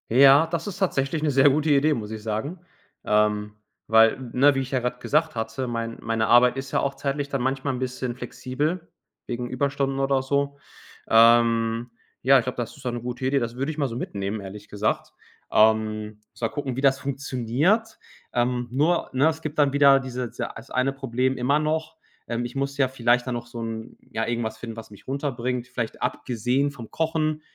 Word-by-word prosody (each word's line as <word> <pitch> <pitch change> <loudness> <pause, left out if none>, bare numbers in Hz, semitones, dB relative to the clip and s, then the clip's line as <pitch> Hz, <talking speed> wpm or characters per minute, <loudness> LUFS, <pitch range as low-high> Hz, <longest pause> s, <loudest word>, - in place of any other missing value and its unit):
Ja, 135 +5 +7
das 165 +1 -3
ist 200 - -5
tatsächlich 155 -5 0
'ne 150 - +2
sehr 135 +1 +6
gute 150 +3 +1
Idee, 145 +2 +4
muss 110 -5 -5
ich 110 -1 -6
sagen 115 - -3 0.4
ähm 105 0 +1 0.3
weil, 110 +1 +5
'ne, 140 +3 +4
wie - - +1
ich 130 +1 -6
ja 130 - +1
grad 125 0 -3
gesagt 155 +2 +1
hatte, 115 +3 -3
mein 115 -1 -3
meine - - -15
meine 115 -1 0
Arbeit 125 +1 +6
ist 135 0 -6
ja - - +2
auch 140 0 -1
zeitlich 140 +1 -2
dann 140 -2 -2
manchmal 135 +2 -1
'n 125 - -4
bisschen 130 -1 -3
flexibel 150 +7 -3 0.4
wegen 120 0 -4
Überstunden 135 +1 -1
oder 135 -1 +2
so 140 +1 -1 0.5
ähm 115 0 +4 0.3
ja, 135 +2 +7
ich 125 - +2
glaub, 125 - -4
das 120 +2 -4
ist 140 - -15
dann 125 - -1
'ne 120 - -5
gute 125 +2 -4
Idee. 135 +1 +2
Das 120 -1 -3
würd 135 +2 -2
ich 155 - -8
mal 140 - +2
so 115 - -6
mitnehmen, 100 -3 -4
ehrlich 100 +2 -10
gesagt 105 +1 -1 0.4
ähm, 110 -1 +2
muss - - -20
mal 115 - +2
gucken, 135 -2 -4
wie - - -1
das 135 -1 +4
funktioniert 140 - 0 0.4
ähm, 120 0 0
nur, 155 +7 +1
ne, 135 +4 +4
es 160 0 -1
gibt 155 0 -4
dann 140 -2 +4
wieder 140 -1 +6
dieses 125 -2 -6
ei - - 0 0.3
eine 130 +2 +1
Problem 130 -1 -1
immer 140 +4 +2
noch: 155 +1 -2 0.3
Ähm, 120 +1 -2
ich 120 - -7
muss 140 +1 -2
ja 135 -2 +3
vielleicht 125 -1 +1
dann 125 - -1
noch 120 0 -5
so 120 -1 -7
'n 115 0 -6
ja 115 0 -1
irgendwas 115 -2 -2
finden, 115 -1 -7
was 115 - -9
mich 105 - -15
runterbringt, 125 -3 -2
vielleicht 115 -3 -5
abgesehen 125 +4 0
vom 120 -5 -10
Kochen, 155 -1 -1
130 Hz, 205 wpm, -25 LUFS, 115-140 Hz, 0.5 s, Ja